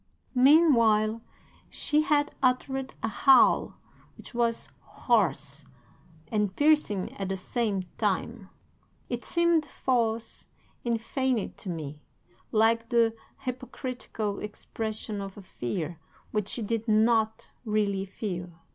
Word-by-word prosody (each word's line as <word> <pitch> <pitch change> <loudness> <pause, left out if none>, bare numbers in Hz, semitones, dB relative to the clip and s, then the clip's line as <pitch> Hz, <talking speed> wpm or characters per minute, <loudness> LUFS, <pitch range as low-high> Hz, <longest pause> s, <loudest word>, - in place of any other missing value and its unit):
"'Meanwhile 235 -6 +5 0.5
she 300 +1 +1
had 295 -1 +1
uttered 265 +1 0
a - - +1
howl 265 +4 +4 0.4
which - - -10
was 235 -1 0
hoarse 155 - 0 0.7
and 210 -2 0
piercing 295 -11 +2
at 195 -1 -3
the 195 - -1
same 205 -1 -1 0.2
time. - - -1 0.6
It 240 -1 -3
seemed 340 -2 +2
false 230 -5 -1 0.4
and 235 -1 0
feigned 255 -1 -1
to 190 - -7
me, 150 -3 -5 0.5
like 225 +1 +3
the 230 -2 +3 0.3
hypocritical 250 -5 -4
expression 215 0 -5
of 195 0 -7
a 200 - -10
fear 160 +2 -4 0.3
which 210 -2 -1
she 235 - -3
did 225 +2 -2
not 220 +1 +2
really 205 -3 0
feel. 185 -3 -5
225 Hz, 110 wpm, -28 LUFS, 205-255 Hz, 0.7 s, Meanwhile